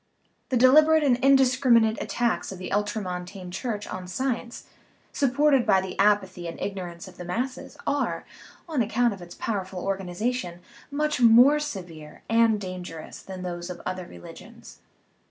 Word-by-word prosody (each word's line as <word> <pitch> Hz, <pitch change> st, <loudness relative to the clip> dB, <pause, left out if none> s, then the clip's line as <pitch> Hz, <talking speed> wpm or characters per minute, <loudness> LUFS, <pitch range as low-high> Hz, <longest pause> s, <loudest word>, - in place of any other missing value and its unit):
The 260 Hz, -, +1 dB
deliberate 305 Hz, +5 st, +6 dB
and 260 Hz, -4 st, +3 dB
indiscriminate 255 Hz, -4 st, +4 dB
attacks 240 Hz, -4 st, -1 dB
of 190 Hz, -, -7 dB
the 185 Hz, -, -7 dB
ultramontane 190 Hz, -3 st, -3 dB
Church 205 Hz, +1 st, -4 dB
on 185 Hz, 0 st, -7 dB
science, 240 Hz, +4 st, -3 dB, 0.5 s
supported 275 Hz, 0 st, +3 dB
by 190 Hz, -, +4 dB
the 190 Hz, -1 st, -5 dB
apathy 195 Hz, -4 st, +2 dB
and 165 Hz, -, -7 dB
ignorance 180 Hz, -3 st, -5 dB
of 185 Hz, -, -14 dB
the -, -, -7 dB
masses, 245 Hz, +9 st, -4 dB
are, -, -, -1 dB, 0.4 s
on 305 Hz, -6 st, 0 dB
account 235 Hz, +1 st, +1 dB
of 195 Hz, -, -11 dB
its 175 Hz, 0 st, -11 dB
powerful 190 Hz, -4 st, -4 dB
organization, 195 Hz, 0 st, -3 dB, 0.3 s
much 300 Hz, -2 st, -1 dB
more 245 Hz, +6 st, +7 dB
severe 175 Hz, -, -7 dB
and 225 Hz, -1 st, +4 dB
dangerous 180 Hz, -4 st, -7 dB
than 185 Hz, -1 st, -8 dB
those 175 Hz, 0 st, -5 dB
of 180 Hz, -, -7 dB
other 185 Hz, -1 st, -4 dB
religions. 85 Hz, 0 st, -13 dB
205 Hz, 145 wpm, -26 LUFS, 180-250 Hz, 0.5 s, more